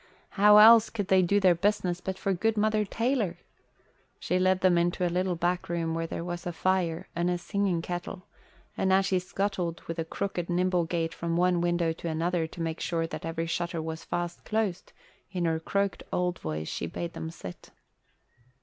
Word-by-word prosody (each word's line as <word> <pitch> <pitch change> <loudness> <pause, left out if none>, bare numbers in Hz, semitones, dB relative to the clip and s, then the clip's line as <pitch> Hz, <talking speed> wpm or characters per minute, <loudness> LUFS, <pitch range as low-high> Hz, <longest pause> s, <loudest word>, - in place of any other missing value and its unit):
How 210 +1 +6
else 225 +1 +8
could 205 -4 -4
they 190 -1 +5
do 200 +3 +3
their 185 -3 +5
business 180 -1 0
but 190 0 -4
for 195 - 0
good 220 +5 0
Mother 215 0 +2
Taylor?" 225 -5 -1 0.8
She 180 - 0
led 185 0 +2
them 185 -1 +4
into 175 +1 +1
a 175 - -1
little 180 0 0
back 175 +1 -1
room 165 -1 -1
where 165 0 -2
there 165 - -4
was 175 0 -5
a - - -1
fire 175 -2 0
and 170 +1 +1
a 180 - 0
singing 190 -2 -1
kettle; 180 +2 -5 0.5
and 190 - +1
as 190 +1 +4
she 190 -1 +2
scuttled 185 -2 -2
with 165 0 -5
a - - +1
crooked, 175 +1 -4
nimble 180 0 +1
gait 165 -1 -2
from 170 0 -2
one 180 -1 +3
window 175 -1 +1
to 165 +1 -5
another 165 +1 0
to 170 - -9
make 165 0 -3
sure 165 -1 -1
that 165 - -6
every 165 0 -2
shutter 170 0 -2
was 160 0 -5
fast 175 0 -4
closed, 210 -5 -2 0.4
in 180 -2 -1
her 160 -1 +1
cracked 200 +2 -1
old 180 -1 -1
voice 80 0 -4
she - - -3
bade 170 - -5
them 160 - -5
sit. 90 - -10
175 Hz, 195 wpm, -28 LUFS, 165-190 Hz, 0.8 s, else